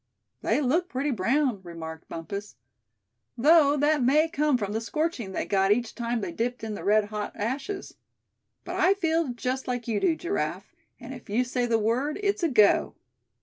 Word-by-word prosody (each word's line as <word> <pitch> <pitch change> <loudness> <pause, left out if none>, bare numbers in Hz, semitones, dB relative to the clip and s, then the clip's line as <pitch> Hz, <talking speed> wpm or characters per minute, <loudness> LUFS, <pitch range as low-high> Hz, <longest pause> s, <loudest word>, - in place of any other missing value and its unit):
"They - - +1
look 325 +7 +1
pretty 275 +3 -1
brown," 240 +1 +1
remarked 165 -2 -9
Bumpus, 200 +3 -6 0.8
"though 295 +2 +5
that 295 0 +2
may 295 +6 +4
come 300 -4 +1
from 205 -3 -3
the 220 +2 -2
scorching 265 - -2
they - - -2
got 195 0 +2
each 235 +2 +1
time 235 -1 -2
they 190 -3 -3
dipped 240 +4 -3
in 220 -1 -3
the 205 - -7
red 210 +1 +3
hot 210 -1 -4
ashes. 275 - -4 0.7
But - - -4
I 385 +2 +4
feel 330 -4 +1
just 255 +2 -3
like 245 -2 -3
you 220 -3 0
do, 330 - +2
Giraffe; 350 +5 -3 0.3
and 245 +1 -8
if 245 -5 -12
you 230 +5 +2
say 245 0 -1
the 230 -1 +2
word, 245 - 0
it's 400 -1 +1
a 335 - +2
go." 215 -6 +4
245 Hz, 185 wpm, -27 LUFS, 215-300 Hz, 0.8 s, though